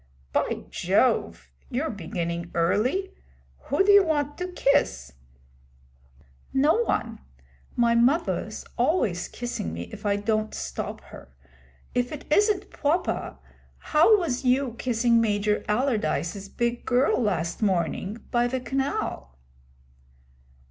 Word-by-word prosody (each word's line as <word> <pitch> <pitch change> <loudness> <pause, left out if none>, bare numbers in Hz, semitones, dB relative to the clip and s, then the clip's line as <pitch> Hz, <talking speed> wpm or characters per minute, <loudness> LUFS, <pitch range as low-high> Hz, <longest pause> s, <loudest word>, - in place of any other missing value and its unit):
'By - - 0
Jove! 65 - +1 0.2
You're 290 +5 -1
beginning 170 -2 -4
early. 250 - +1 0.5
Who 385 - +2
do 410 - +6
you 405 -1 +8
want 295 -3 0
to 360 - -2
kiss?' 280 - +1 1.4
'No 290 +8 +3
one. 225 -2 -2 0.6
My 235 -1 +3
muvver's 265 +9 +1
always 205 - +1
kissing 240 - -5
me 85 - -4
if - - -10
I 205 -1 +2
don't 215 +1 -1
stop - - -5
her. 60 - -13 0.6
If 245 0 0
it 300 -1 -7
isn't 410 0 +2
pwoper, 325 +5 -1 0.4
how 325 +8 +4
was 295 -10 -2
you 255 -1 +2
kissing 235 -1 +2
Major 210 -1 +1
Allardyce's 200 - -1
big 235 +2 -2
girl 255 +1 +2
last 175 -6 -1
morning, 190 +2 -1
by 240 0 +2
ve 260 +1 -2
canal?' 265 - -3
240 Hz, 115 wpm, -26 LUFS, 200-285 Hz, 1.4 s, you